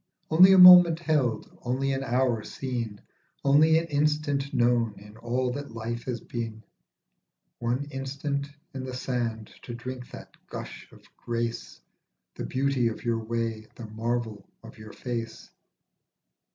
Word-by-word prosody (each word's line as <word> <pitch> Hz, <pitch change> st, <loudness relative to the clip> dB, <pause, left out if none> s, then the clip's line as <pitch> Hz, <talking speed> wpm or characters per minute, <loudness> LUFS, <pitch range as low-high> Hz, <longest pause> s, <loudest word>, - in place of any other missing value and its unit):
Only 180 Hz, +4 st, +8 dB
a -, -, +6 dB
moment 180 Hz, -2 st, +10 dB
held, 150 Hz, -8 st, -1 dB
only 135 Hz, +2 st, -1 dB
an 135 Hz, 0 st, -2 dB
hour 125 Hz, -3 st, 0 dB
seen, 120 Hz, -6 st, -5 dB, 0.4 s
Only 155 Hz, +3 st, +5 dB
an 165 Hz, -, 0 dB
instant 145 Hz, -2 st, 0 dB
known 120 Hz, -3 st, +2 dB
in 105 Hz, +1 st, -14 dB
all 125 Hz, +2 st, -1 dB
that 140 Hz, -3 st, -7 dB
life 115 Hz, +1 st, -5 dB
has 125 Hz, -2 st, -3 dB
been, 115 Hz, -2 st, -6 dB, 1.0 s
One 120 Hz, +4 st, -1 dB
instant 140 Hz, +1 st, -3 dB, 0.3 s
in 130 Hz, -1 st, -5 dB
the 130 Hz, -1 st, -6 dB
sand 120 Hz, -4 st, -3 dB
to 120 Hz, -, -7 dB
drink 125 Hz, +1 st, -7 dB
that -, -, -12 dB
gush -, -, -9 dB
of -, -, -18 dB
grace, 115 Hz, -, -4 dB, 0.5 s
The -, -, -6 dB
beauty 130 Hz, -2 st, 0 dB
of 115 Hz, -, -5 dB
your 115 Hz, -1 st, 0 dB
way, 115 Hz, -1 st, -3 dB
the 120 Hz, -, -8 dB
marvel 110 Hz, 0 st, -4 dB
of 115 Hz, 0 st, -13 dB
your 110 Hz, 0 st, -10 dB
face. 115 Hz, -3 st, -6 dB
125 Hz, 140 wpm, -27 LUFS, 115-140 Hz, 1.0 s, moment